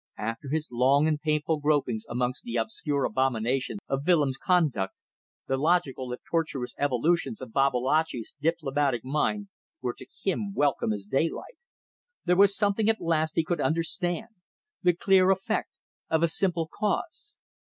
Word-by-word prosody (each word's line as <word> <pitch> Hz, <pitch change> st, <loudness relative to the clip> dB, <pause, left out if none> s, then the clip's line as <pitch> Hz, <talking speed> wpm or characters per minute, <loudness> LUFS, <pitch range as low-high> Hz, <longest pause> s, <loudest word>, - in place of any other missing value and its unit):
After 115 Hz, +5 st, -4 dB
his 155 Hz, +2 st, -1 dB
long 135 Hz, +5 st, +3 dB
and 150 Hz, -1 st, 0 dB
painful 155 Hz, 0 st, 0 dB
gropings 145 Hz, -7 st, 0 dB
amongst 125 Hz, +1 st, -1 dB
the 240 Hz, -, -5 dB
obscure 145 Hz, -10 st, -1 dB
abominations 130 Hz, -, 0 dB
of 135 Hz, 0 st, -1 dB
Willems' 150 Hz, -7 st, +3 dB
conduct, 150 Hz, -, +1 dB, 0.5 s
the 135 Hz, -, 0 dB
logical 140 Hz, -5 st, +1 dB
if 125 Hz, -, -6 dB
tortuous 150 Hz, -7 st, -2 dB
evolutions 160 Hz, -, +1 dB
of 110 Hz, -, -9 dB
Babalatchi's 135 Hz, -1 st, +1 dB
diplomatic 140 Hz, -5 st, 0 dB
mind 195 Hz, +9 st, -1 dB, 0.3 s
were 125 Hz, -1 st, -2 dB
to 130 Hz, -, -12 dB, 0.2 s
him 200 Hz, +1 st, -1 dB
welcome 140 Hz, -6 st, +1 dB
as 100 Hz, -2 st, -3 dB
daylight. 155 Hz, -, -2 dB, 0.7 s
There 180 Hz, 0 st, +3 dB
was 200 Hz, +1 st, +5 dB
something 205 Hz, +1 st, +2 dB
at 225 Hz, -, +2 dB
last 160 Hz, -1 st, 0 dB
he 165 Hz, -, +3 dB
could 170 Hz, +2 st, -1 dB
understand 175 Hz, +5 st, 0 dB, 0.5 s
the 180 Hz, -1 st, +3 dB
clear 190 Hz, +1 st, +4 dB
effect 195 Hz, +3 st, 0 dB, 0.4 s
of 160 Hz, 0 st, +2 dB
a -, -, +5 dB
simple 170 Hz, -1 st, 0 dB
cause. 320 Hz, -, -3 dB
155 Hz, 145 wpm, -27 LUFS, 130-180 Hz, 0.7 s, was